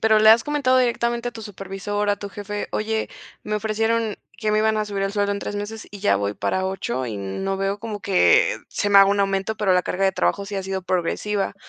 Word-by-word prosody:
pero 220 -1 +4
¿le 215 0 +6
has 225 +1 +7
comentado 285 -3 +2
directamente 240 -1 +1
a - - -29
tu 225 - -9
supervisor, 205 0 -3
a 205 - +1
tu 200 +1 -7
jefe?: 205 +1 -5
"Oye, 220 +1 -1 0.3
me 215 - -3
ofrecieron 220 +1 0 0.2
que 215 -2 -1
me 215 - +3
iban 220 0 +2
a 215 - 0
subir 200 -1 -3
el 195 - -2
sueldo 205 -1 +1
en 200 - -3
3 205 - -5
meses, 220 +2 -6
y 205 - -10
ya 100 - +3
voy 100 +1 -2
para 190 0 -1
8, 190 - -3
y 110 - -4
no 100 - -3
veo 195 +1 -1
como 215 -1 -6
que 200 - +4
se 205 - -1
me 200 - +8
haga 195 0 +7
un 200 0 +2
aumento, 195 +2 0
pero 210 -3 +2
la 180 0 +3
carga 195 +2 -1
de 190 - +3
trabajo 200 +1 0
sí 200 0 -5
ha 195 - -2
sido 190 0 -3
progresiva" 195 +3 -1
205 Hz, 245 wpm, -23 LUFS, 195-220 Hz, 0.3 s, me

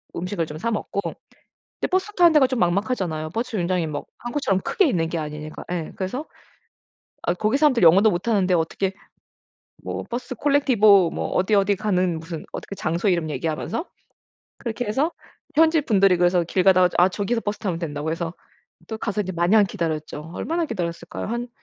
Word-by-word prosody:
음식을 180 -1 -2
좀 150 0 -8
사 230 +9 -2
먹고 210 -2 -3
근데 - - -9
버스 375 +3 +1
타는 345 -4 +5
데가 290 -4 +5
좀 255 -1 -2
막막하잖아요. 175 -4 0
버스 245 +3 -3
정류장이 180 -5 0
뭐 145 -1 -5
한국처럼 240 -6 -1
크게 390 - +2
있는 165 -9 0
게 170 - -3
아니니까 150 0 -6
예. 170 -3 -3
그래서 225 +11 -3 1.0
아 175 - 0
거기 215 +8 +1
사람들 285 -7 +3
영어도 190 +6 +7
못하는데 190 -1 +1
어떻게 175 +3 0 0.9
뭐 - - -4
버스 250 +2 -5
콜렉티보 220 - +4
뭐 - - -3
어디 190 +3 +1
어디 200 0 +3
가는 185 -5 0
무슨 165 0 -7
어떻게 200 - -6
장소 170 +4 0
이름 170 -4 0
얘기하면서 165 - -3 0.7
그렇게 235 -1 -4
해서 275 +11 0 0.4
현지분들이 265 - +4
그래서 175 0 +3
길 180 +2 0
가다가 185 -2 +6
"아 180 +1 +6
저기서 205 +5 -1
버스 205 0 -3
타면 185 -6 -2
된다."고 150 -2 -3
해서 165 0 -3 0.6
또 220 - -4
가서 210 -1 -2
이제 185 -1 -5
마냥 180 +5 +4
기다렸죠. 160 -4 -4
얼마나 335 +1 -1
기다렸을까요? 170 - -4
한 240 +2 -3
190 Hz, 390 characters per minute, -23 LUFS, 170-230 Hz, 1.0 s, 영어도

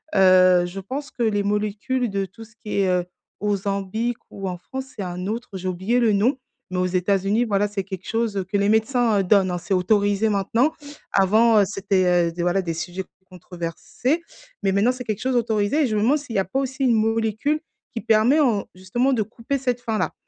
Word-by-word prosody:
heu, 185 -2 +6
je 185 +2 -7
pense 275 +9 -6
que 240 - -3
les 205 -2 +1
molécules 210 +5 -1
de 195 -1 -1
tout 200 +5 -13
ce 220 +1 -23
qui 210 -3 -2
est, 195 - +2
heu, 180 -1 +1 0.4
Ozempic 205 +3 -1
ou 195 -1 -5
en 180 - -5
France 265 +8 -8
c'est 200 - -4
un 180 0 -5
autre, 230 +4 -4
j'ai 185 0 -5
oublié 190 +7 0
le 230 -3 +3
nom 230 +7 +2 0.3
mais 185 - -2
aux 180 - +2
États-Unis, 195 +5 +1
voilà, 205 -2 +1
c'est 205 -1 -3
quelque 190 -2 -8
chose, 225 -2 -1
heu, 195 - 0
que 200 +2 -1
les 200 0 +2
médecins, 220 0 +2
heu, - - +2
donnent, 190 -1 +3
hein, 175 - -1
c'est 190 +3 -1
autorisé 205 +3 +2
maintenant. 220 +8 +1 0.4
Avant, 215 +3 +4
heu, - - +5
c'était, 185 -3 +1
heu, - - -6
des 175 - -4
voilà, 180 +2 +2
des 170 -2 -2
sujets 180 +3 -5 0.2
controversés, 180 - -3 0.4
mais 195 - +2
maintenant 205 +5 +3
c'est 250 0 -7
quelque 215 -3 -3
chose 260 0 0
autorisé 225 +4 +1
et - - +2
je 215 - -2
me 210 - +1
demande 260 +8 +3
s'il 280 -5 -8
y - - +4
a 190 - 0
pas 190 - -4
aussi 270 0 -3
une 245 -3 +4
molécule 225 +6 0 0.3
qui 230 - -4
permet 225 +7 +4
en 230 -8 +2
justement, 240 +9 0
de 235 - +1
couper 230 +5 -4
cette 250 -2 -1
faim-là, 225 -3 -1
205 Hz, 220 wpm, -23 LUFS, 190-235 Hz, 0.4 s, heu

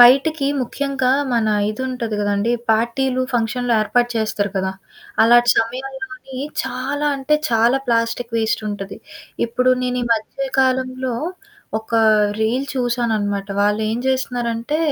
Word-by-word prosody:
బయిటికి 275 +4 +6 0.2
ముఖ్యంగా 270 0 -1 0.2
మన 225 -2 +2 0.2
ఇదుంటది 240 -2 -3
గదండీ 205 +3 +1 0.2
పార్టీలు, 250 +4 +1
ఫంక్షన్లు 240 +1 0
ఏర్పాటు 240 +3 +1
చేస్తారు 215 -2 -1
కదా! 190 0 0 0.5
అలాటి 240 +1 +6
సమయాల్లోని 265 +4 -4 0.3
చాలా 285 +3 -2
అంటే 275 +3 +1 0.2
చాలా 235 +3 +3
ప్లాస్టిక్ 230 0 0
వేస్టుంటది. 215 -3 -2 0.5
ఇప్పుడు 250 +2 +2
నేను 250 0 -1
ఈ - - 0
మధ్య 265 +5 -3
కాలంలో 255 -1 0 0.6
ఒకా 225 +1 0 0.4
రీల్ 250 +5 +1
చూసాననమాట. 220 -5 -1
వాళ్ళు 210 +1 +2
ఏం 230 - -1
జేస్తన్నారంటే, 245 0 -1
240 Hz, 115 wpm, -20 LUFS, 225-260 Hz, 0.6 s, బయిటికి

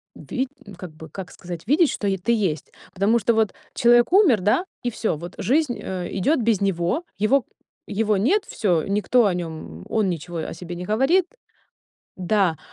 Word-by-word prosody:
ви 260 0 -3 0.3
как 180 -3 -8
бы, 160 0 -12
как 185 +3 -8
сказать, 175 +2 -8
видеть, 305 +3 +4
что 205 - -3
е 195 -1 +1
ты 210 +7 -1
есть. 185 -10 -1 0.2
Потому 205 +5 +2
что 230 +2 +2
вот 220 -2 +1 0.2
человек 240 +2 +4
умер, 325 - +5
да, 220 - +2 0.2
и 245 - 0
всё, 220 -5 -1
вот 175 +3 -9
жизнь, 265 - +1
э, 180 -2 -4
идёт 280 - +2
без 225 -3 +1
него, 195 - 0
его 225 +4 +2 0.5
его 210 0 +1
нет, 385 - +2
всё, 175 -7 0
никто 210 +4 +2
о 195 - +2
нём, 160 - -6
м - - -12
он 215 -3 +1
ничего 170 0 -4
о 160 - -4
себе 175 +1 -7
не 180 +1 -6
говорит. 270 - +3 0.9
Да, 185 -3 +1
205 Hz, 185 wpm, -23 LUFS, 175-240 Hz, 0.9 s, умер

